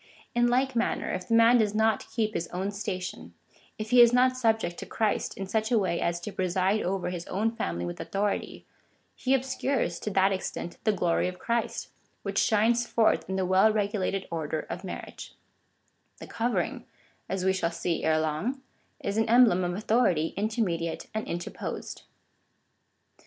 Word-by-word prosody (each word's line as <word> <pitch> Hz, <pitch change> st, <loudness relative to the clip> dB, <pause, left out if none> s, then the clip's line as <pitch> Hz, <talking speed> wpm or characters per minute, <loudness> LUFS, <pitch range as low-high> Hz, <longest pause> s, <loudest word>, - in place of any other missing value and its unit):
In 240 Hz, 0 st, +3 dB
like 260 Hz, +2 st, +1 dB
manner, 235 Hz, -, 0 dB
if 180 Hz, 0 st, -4 dB
the 230 Hz, -, +2 dB
man 230 Hz, +1 st, +6 dB
does 210 Hz, -1 st, +1 dB
not 220 Hz, 0 st, +1 dB
keep 215 Hz, -3 st, -1 dB
his 165 Hz, -, -2 dB
own 190 Hz, +3 st, -3 dB
station 180 Hz, -, -5 dB, 0.2 s
— -, -, -30 dB
if 215 Hz, 0 st, -5 dB
he 250 Hz, -1 st, +8 dB
is 235 Hz, -1 st, +8 dB
not 255 Hz, +1 st, +4 dB
subject 225 Hz, -8 st, 0 dB
to -, -, -7 dB
Christ 220 Hz, -2 st, -1 dB
in 195 Hz, -, -3 dB
such 220 Hz, +3 st, -1 dB
a 235 Hz, -, +4 dB
way 185 Hz, -4 st, 0 dB
as 170 Hz, 0 st, 0 dB
to 210 Hz, -, -5 dB
preside 190 Hz, +2 st, +1 dB
over 180 Hz, -1 st, -2 dB
his 175 Hz, -1 st, -6 dB
own 215 Hz, +4 st, 0 dB
family 85 Hz, -, -3 dB
with 85 Hz, -, -6 dB
authority, 200 Hz, +1 st, -2 dB, 0.5 s
he 265 Hz, +1 st, +2 dB
obscures, 265 Hz, 0 st, -1 dB
to -, -, -3 dB
that 195 Hz, 0 st, +3 dB
extent, 185 Hz, -2 st, -4 dB
the 215 Hz, -, +5 dB
glory 180 Hz, -3 st, +1 dB
of 180 Hz, 0 st, -5 dB
Christ, 235 Hz, +3 st, -2 dB, 0.3 s
which -, -, -1 dB
shines 230 Hz, +2 st, +3 dB
forth 225 Hz, -4 st, +2 dB
in 190 Hz, -, -1 dB
the 190 Hz, -1 st, 0 dB
well 190 Hz, +4 st, +5 dB
regulated 200 Hz, -2 st, -1 dB
order 160 Hz, -2 st, -2 dB
of 180 Hz, +3 st, -5 dB
marriage 185 Hz, -, -8 dB, 0.8 s
The -, -, -9 dB
covering, 235 Hz, +1 st, -2 dB, 0.4 s
as 190 Hz, -1 st, -2 dB
we 190 Hz, -, +4 dB
shall 175 Hz, -3 st, 0 dB
see 170 Hz, 0 st, -2 dB
ere 155 Hz, 0 st, +3 dB
long, 160 Hz, -, -1 dB, 0.4 s
is 200 Hz, -, -2 dB
an 225 Hz, 0 st, +1 dB
emblem 230 Hz, -7 st, +5 dB
of 175 Hz, 0 st, -1 dB
au 205 Hz, -, -4 dB
thority 185 Hz, -9 st, +2 dB
intermediate 195 Hz, -6 st, -2 dB
and 220 Hz, 0 st, -3 dB
interposed. 175 Hz, +1 st, -5 dB
200 Hz, 180 wpm, -28 LUFS, 180-230 Hz, 0.8 s, he